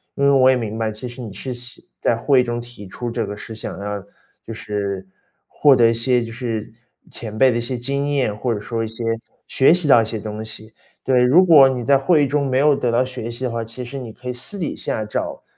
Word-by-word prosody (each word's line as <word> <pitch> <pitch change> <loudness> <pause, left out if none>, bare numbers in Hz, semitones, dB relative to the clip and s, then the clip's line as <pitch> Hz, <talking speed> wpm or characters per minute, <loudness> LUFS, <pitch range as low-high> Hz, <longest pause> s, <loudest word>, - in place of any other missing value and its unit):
因 140 - +1
为 140 - +5
我 130 -1 +5
也 130 - +5
明 110 -3 -3
白， 110 -1 -1
其 110 +4 -7
实 120 +1 -9
你 110 -4 -7
是 130 +6 -6
希 125 +1 -12
在 120 - +2
会 130 +3 +3
议 - - 0
中 120 -1 -3
提 120 -4 -10
出 120 +5 -5
这 115 0 -1
个 105 0 -6
是 115 - -9
想 110 - -7
要， 100 0 -4 0.4
就 - - -8
是 100 -3 -4 0.4
获 145 -2 +4
得 120 -2 +5
一 - - +1
些 120 +1 +1
就 115 - -7
是 115 -3 -4 0.4
前 110 -2 -7
辈 130 +2 +5
的 120 - -1
一 - - -2
些 125 +2 -4
经 140 +4 -2
验， 130 -7 0
或 120 +3 -2
者 110 - -1
说 115 +2 -3
一 110 - -3
些 115 +2 -7 0.4
学 135 - +4
习 170 -3 +2
到 120 -4 +7
一 - - -1
些 110 0 -4
东 105 +1 -6
西。 110 0 -10 0.3
对， 130 -2 +3
如 145 +10 +6
果 145 -6 +8
你 125 -2 -3
在 135 +3 +4
会 150 +1 +3
议 - - +1
中 140 +1 0
没 130 -1 0
有 145 +1 +4
得 125 -3 -1
到 120 +2 +2
学 125 -3 -6
习 120 +2 -7
的 125 - -1
话， 115 0 -2
其 115 +3 -8
实 135 +3 -6
你 120 -3 -7
可 125 +3 -12
以 125 - -2
私 125 +11 -6
底 170 -5 -3
下 110 - -3
找 105 - -4
120 Hz, 285 characters per minute, -20 LUFS, 110-130 Hz, 0.4 s, 果